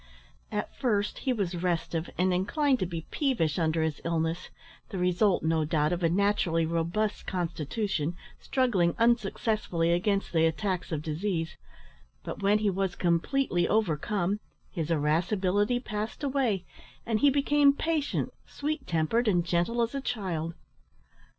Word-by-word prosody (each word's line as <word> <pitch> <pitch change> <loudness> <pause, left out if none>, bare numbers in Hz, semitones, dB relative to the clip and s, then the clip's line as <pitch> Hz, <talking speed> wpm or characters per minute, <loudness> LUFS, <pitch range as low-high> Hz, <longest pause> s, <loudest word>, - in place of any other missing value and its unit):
At 210 -1 -3
first 205 -6 0
he 265 - 0
was 200 -7 -1
restive, 170 -2 -1
and 185 +1 +2
inclined 260 - +1
to 185 - 0
be 165 -2 -5
peevish 225 - +1
under 160 -1 +1
his 160 -2 -2
illness, 165 +1 -1 0.4
the 195 - -5
result, 180 +2 +2
no 160 0 +2
doubt, 150 0 +1
of 175 - -2
a 165 - +3
naturally 180 -3 +2
robust 170 +6 -1
constitution 170 -1 -2 0.2
struggling 200 -10 +1
unsuccessfully 215 -6 +1
against 195 +3 0
the 165 -1 +4
attacks 180 +3 -2
of 155 -2 -2
disease, 165 +1 -2 0.7
but - - -6
when 200 +1 +4
he 210 -1 +1
was 190 -1 -1
completely 175 +2 +1
overcome, 200 0 0 0.3
his 165 -4 -3
irascibility 185 +8 +1
passed 215 +1 -5
away, 255 -10 0 0.4
and 225 -2 +1
he 285 - +6
became 285 +1 +4
patient, 305 0 -1
sweet 305 +2 -3
tempered, 175 +9 +1
and 175 -5 +3
gentle 175 +8 +1
as 230 - -2
a 275 - -2
child. 170 -10 -3
185 Hz, 140 wpm, -28 LUFS, 165-220 Hz, 0.7 s, he